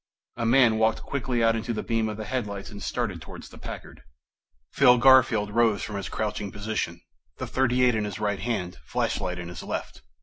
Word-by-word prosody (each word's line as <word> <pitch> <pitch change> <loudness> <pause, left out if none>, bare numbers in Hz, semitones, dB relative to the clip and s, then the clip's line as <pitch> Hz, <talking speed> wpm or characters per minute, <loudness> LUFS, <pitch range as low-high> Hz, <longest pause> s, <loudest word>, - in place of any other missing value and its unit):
A 115 -1 -1
man 120 -3 +5
walked 110 0 +2
quickly 125 -3 -1
out 115 0 +4
into 115 +1 -2
the 110 - -3
beam 115 -2 0
of 105 - -5
the 110 - -5
headlights 105 -4 -4
and 100 -1 -9
started 100 -9 -2
towards - - -10
the - - -14
Packard. - - -9 0.7
Phil 125 -3 +6
Garfield 120 -5 +5
rose 115 -2 +2
from 105 - -5
his 95 -5 -5
crouching 105 -1 -3
position, 100 -5 -3 0.4
the - - -4
.38 125 -1 +2
in 110 -1 0
his 105 0 -5
right 105 -2 -1
hand, 95 -5 -3
flashlight 90 -1 -2
in 85 -1 -6
his 90 - -7
left. - - -5
110 Hz, 195 wpm, -26 LUFS, 100-120 Hz, 0.7 s, Phil